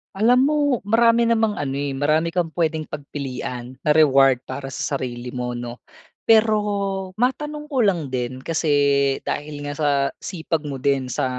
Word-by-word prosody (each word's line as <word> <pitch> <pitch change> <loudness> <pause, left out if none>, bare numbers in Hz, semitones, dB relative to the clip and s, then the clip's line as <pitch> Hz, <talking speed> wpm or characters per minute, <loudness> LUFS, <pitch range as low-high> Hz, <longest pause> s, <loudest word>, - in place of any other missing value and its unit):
Alam 245 +6 +4
mo, 300 +1 +1 0.3
marami 230 +2 +4
namang 225 -2 +1
ano, 135 -2 -2
eh, 140 0 -2
marami 155 +4 +1
kang 165 -2 -2
pwedeng 160 -2 -1
pagpilian, 130 -4 -6
na 150 - -2
reward 135 -4 +5
para 135 -1 -6
sa 140 - -4
sarili 125 -2 -4
mo, 125 -1 -3
'no? 120 0 -7 0.4
Pero 220 -1 +4 0.6
matanong 295 +5 -1
ko 275 -5 0
lang 170 -10 0
din, 125 0 -2
kasi 140 -4 +2
dahil 145 0 -4
nga 145 - -3
sa 150 -1 0 0.3
sipag 165 -3 -3
mo 135 - -4
din 135 -1 0
sa - - -1
145 Hz, 160 wpm, -22 LUFS, 135-210 Hz, 0.6 s, reward